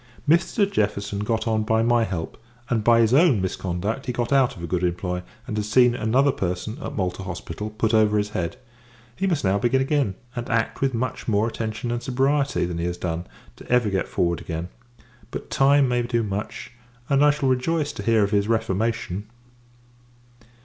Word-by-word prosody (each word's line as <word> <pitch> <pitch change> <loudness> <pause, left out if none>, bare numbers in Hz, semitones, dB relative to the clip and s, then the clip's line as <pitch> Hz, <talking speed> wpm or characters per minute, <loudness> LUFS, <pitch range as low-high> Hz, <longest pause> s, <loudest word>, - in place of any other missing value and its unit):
Mr. 170 +6 +3
Jefferson 100 - -1
got 110 +2 -1
on, 110 -1 +1
by 110 +1 +1
my 120 0 +3
help; 90 -7 -4 0.4
and, 115 -3 +1
by 115 +1 +5
his 115 +1 +3
own 145 - +5
misconduct, 95 +7 -3
he - - 0
got 120 +1 -1
out 135 -3 +3
of 85 - -9
a - - -1
good 90 +1 -1
employ, 90 0 -1 0.2
and 115 -5 -4
has 105 0 -2
seen 125 +2 +5
another 125 +5 +2
person, 95 -2 -3
at - - -5
Malta 95 -2 -2
hospital, 95 +2 -6
put 110 +1 -1
over 105 -1 +4
his 105 0 0
head. 85 -5 -3 0.6
He 195 - -1
must 170 -6 0
now 100 +1 +2
begin 125 +3 +2
again; 135 -7 +1 0.2
and 120 -1 -4
act 115 -1 0
with 135 -2 +1
much 125 +1 -3
more 110 0 +2
attention 110 +1 -4
and 120 0 -2
sobriety, 135 +2 +1
than 85 -1 -4
he 85 - -1
has 90 0 -2
done, 85 0 -3 0.3
to - - -13
ever 120 -4 +3
get 95 - 0
forward 85 -1 0
again: 85 +2 -5 0.6
but, - - -7
time 140 0 +4
may 120 -1 +1
do 120 -1 0
much; 105 +3 -5 0.4
and, 140 0 +3
I 150 - +6
shall 145 -2 +1
rejoice 145 +4 0
to 100 - -7
hear 110 0 +3
of 100 - 0
his 100 -1 +2
reformation. 110 -2 -1
110 Hz, 195 wpm, -24 LUFS, 100-125 Hz, 0.6 s, I